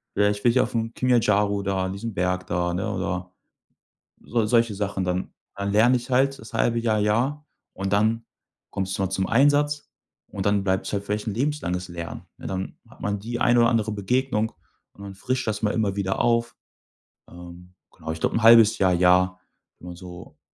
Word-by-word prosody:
Ja, 105 0 +3
ich 105 0 -3
will 120 - +6
hier 130 - +4
auf - - -5
'm 115 0 -2
Kilimanjaro 105 -5 +2
da 95 -1 -1
an 95 - -3
diesem 110 +3 -5
Berg 90 -1 -1
da“, 90 0 -1
ne? 95 +2 -2
Oder 90 -1 -3 0.9
so 115 -2 -1
solche 115 -1 +2
Sachen 100 -2 -2
dann. 90 0 0
Dann - - -24 0.3
dann 100 0 -2
lerne 120 +4 +5
ich 120 +1 -6
halt 135 +2 +2
das 110 - -12
halbe 115 0 +1
Jahr, 110 -2 +1
Jahr 125 +8 0 0.3
und 95 0 -4
dann 110 +3 +2 0.5
kommst 95 -1 -3
du - - 0
mal 95 - -1
zum 95 0 -1
Einsatz 145 +4 +2 0.4
und 100 -1 -5
dann 100 -1 +2
bleibt's 95 -1 -1
halt 100 -1 -1
vielleicht 105 +1 -3
'n 105 - -2
lebenslanges 115 - -2
Lernen, 85 -1 -7 0.2
ne? - - -8
Dann 95 0 -5
hat - - -19
man 100 0 -2
die 120 +3 -5
eine 120 0 +4
oder 115 - +5
andere 110 -2 0
Begegnung, 110 +2 -1 0.4
und - - -20
man 100 -1 -8
frischt 130 +5 -2
das 105 0 -2
mal 105 - +1
immer 105 -3 0
wieder 95 -1 -1
auf. 115 0 +1 0.8
Ähm, 90 +1 -12 0.2
genau, 80 0 -6
ich 80 - -7
glaube - - 0
'n 115 - 0
halbes 115 -1 +7
Jahr, 95 -2 +3
Jahr, 90 +1 +3 0.4
wenn 90 - -10
man 90 - -8
so 90 -1 -11
105 Hz, 205 wpm, -24 LUFS, 95-115 Hz, 0.9 s, halbes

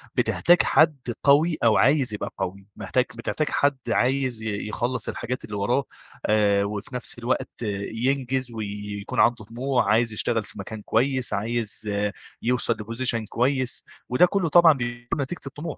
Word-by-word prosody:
بتحتاج 175 +1 +4
حد 155 -2 +4 0.3
قوي 155 +4 +4
أو 115 -2 +5
عايز 135 -3 +3
يبقى 105 - -4
قوي. 95 +2 -4
محتاج 125 -1 0
بتحتاج 145 +6 -2
حد 145 -1 +2
عايز 130 -3 +1
ي 105 -1 -3
يخلّص 125 +3 -2
الحاجات 125 +2 -4
اللي 105 - -7
وراه، 120 +7 +1 0.4
آآ، 105 -2 +3
وفي 105 +4 -5
نَفس 125 - -4
الوقت 120 +2 -1 0.4
ينجز 130 +1 -1
ويكون 105 -2 -5
عنده 120 -3 +3
طموح، 125 +3 -1
عايز 115 0 +2
يشتغل 115 +1 0
في 105 - -11
مكان 105 +2 -7
كويس، 130 +3 +1
عايز 110 0 -2 0.5
يوصل 125 +1 +1
لposition 115 +1 -1
كويس، 130 +1 +1 0.2
وده 125 +8 +5
كلّه 180 -2 0
طبعًا 170 0 +7
بيكون 120 +1 -4
نتيجة 140 +5 -4
الطموح. 150 +3 -6
120 Hz, 150 wpm, -24 LUFS, 110-135 Hz, 0.5 s, طبعًا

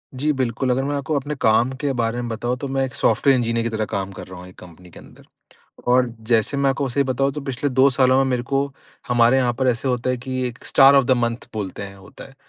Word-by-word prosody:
जी, 145 +4 0
बिल्कुल, 130 -1 -2
अगर 130 +2 0
मैं 145 +1 -2
आपको 145 +2 -2
अपने 145 +2 -5
काम 115 0 +2
के 145 -2 0
बारे 120 -1 -1
में 120 - -4
बताऊँ, 120 +2 -3
तो 140 - -5
मैं 135 0 -1
एक 130 - -8
सॉफ्टवेयर 135 -2 +3
इंजीनियर 115 -1 0
की 115 - -1
तरह 110 -1 -2
काम 100 -2 -4
कर 95 - -10
रहा 90 -1 -10
हूँ 90 - -11
एक 90 - -17
कंपनी 90 0 -15
के - - -14
अंदर। - - -17 0.7
और 125 0 +3 0.2
जैसे 115 +4 +2
मैं 140 -1 +2
आपको 135 0 -2
सही 140 +3 +1
बताऊँ, 135 +1 0
तो 150 - -5
पिछले 135 0 -3
2 130 +1 +4
सालों 130 0 +3
में 135 - +3
मेरे 125 -1 0
को 135 +3 0 0.4
हमारे 120 +1 +4
यहाँ 125 -2 +2
पर 130 - +1
ऐसे 125 +2 -1
होता 125 0 -1
है 125 - 0
कि 130 +1 -4
एक 120 0 -12
स्टार 135 0 +6
ऑफ 135 -1 +5
द - - -2
मंथ 120 0 -2
बोलते 105 -2 -5
हैं, 100 -1 -8
होता 95 - -13
है। 135 - -16
125 Hz, 265 wpm, -21 LUFS, 115-135 Hz, 0.7 s, स्टार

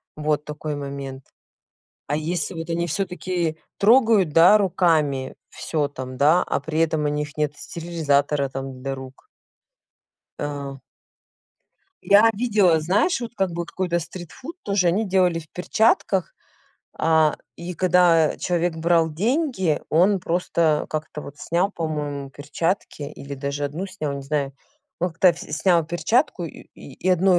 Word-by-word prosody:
Вот 150 -1 0
такой 150 0 -5
момент. 140 -2 -6 0.9
А 145 - +1
если 155 +2 -2
вот 165 0 -6
они 170 +1 -1
всё-таки 175 -1 -2 0.2
трогают, 220 -4 +5
да, 180 +6 +7
руками 155 -8 +1
всё 150 -3 -2
там, 130 -2 -7
да, 155 +7 +5
а - - -1
при 160 0 -3
этом 160 -2 +1
у - - +2
них 150 0 -3
нет 150 -1 0
стерилизатора 150 -4 0
там 135 -1 -6
для 135 0 -3
рук. 130 0 -11 1.1
Э. 140 -2 -4 1.3
Я 210 +3 +6
видела, 200 -7 +3
знаешь, 200 - +1
вот 235 0 -6
как 190 -4 0
бы 170 0 -3
вот 170 - -10
какой-то 175 -2 -1
стритфуд 180 - -9
тоже 200 -3 +1
они 195 +6 +1
делали 180 -3 +2
в 155 - -16
перчатках, 225 - +1 0.7
а, 160 -1 +3 0.2
и 175 +1 -7
когда 175 -3 +4
человек 175 -2 0
брал 165 0 +3
деньги 220 - 0
он 185 +5 +4
просто 170 -3 0
как-то 155 -1 -4
вот 145 0 -10
снял, 175 +7 0
по-моему, 150 -5 -4
перчатки, 150 +4 -3
или 140 0 -7
даже 140 +1 -3
одну 160 +7 -3
снял, 155 -7 -4
не 140 - -6
знаю. 140 -1 -2 0.5
Ну 180 0 +1
к - - -31
то 180 -2 +6
вс 165 - -10
снял 170 +1 +2
перчатку 175 - +1
и 160 - -9
и 145 +6 -6
одной 185 0 +4
165 Hz, 145 wpm, -23 LUFS, 150-180 Hz, 1.3 s, да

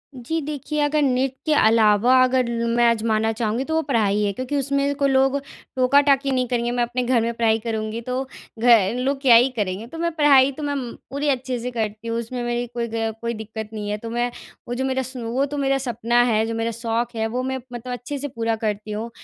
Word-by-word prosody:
जी। 260 +7 -3
देखिए 300 +1 -4
अगर 295 +1 +2
नृत्य 265 +2 0
अलावा 220 +2 +4
अगर 255 -1 +1 0.2
मैं 235 +1 +2
आज़माना 220 -1 +1
चाहूँगी 225 +2 -1
तो 320 - -2
वो 320 - +2
पढ़ाई 215 -8 +1
है 205 - +1
क्योंकि 255 +6 -4
उसमें 280 +1 +1
कोई 280 -1 +1
लोग 270 +1 +3 0.4
टोका-टाकी 275 +1 +3
नहीं 255 -1 0
करेंगे। 240 0 -1
मैं 245 0 +1
अपने 245 +1 -2
घर 245 -1 +2
में 230 +1 -1
पढ़ाई 225 -1 +2
करूँगी 220 0 -3
तो 255 +2 -2 0.4
गए 230 -5 +5
लोग 270 +3 -1
क्या 255 -4 +7
ही 245 +3 +6
करेंगे 205 0 -3
तो 325 - -10
मैं 340 +1 -1
पढ़ाई 280 -3 +5
तो 300 +3 -8
मैं 290 0 -1
उम 255 -4 -4 0.2
पूरी 285 +3 -1
अच्छे 255 -2 -1
से 250 +2 -4
करती 220 -1 -4
हूँ। 230 0 -1
उसमें 240 +1 -4
मेरी 240 0 -2
कोई 235 -1 -2
ग 225 -1 -1
कोई 235 0 -2
दिक़्क़त 220 -1 -7
नहीं 210 -1 -4
है 210 - -1
तो 230 +2 -7
मैं 240 +1 -1 0.4
वो 240 - -3
जो 265 +2 -1
मेरा 265 0 0
सो 255 -2 -6
वो 265 +3 +1
तो 290 +1 -5
मेरा 275 -1 +1
सपना 240 -2 +1
है 220 0 +2
जो 230 - -3
मेरा 225 +1 -1
शौक 230 +1 -2
है। 220 0 0
वो 250 +3 -3
मैं 265 0 -2 0.2
मतलब 245 +1 -5
अच्छे 245 +4 -5
से 285 +1 -4
पूरा 230 -3 -2
करती 210 0 -3
हूँ। 215 +3 -4
240 Hz, 230 wpm, -22 LUFS, 225-265 Hz, 0.4 s, क्या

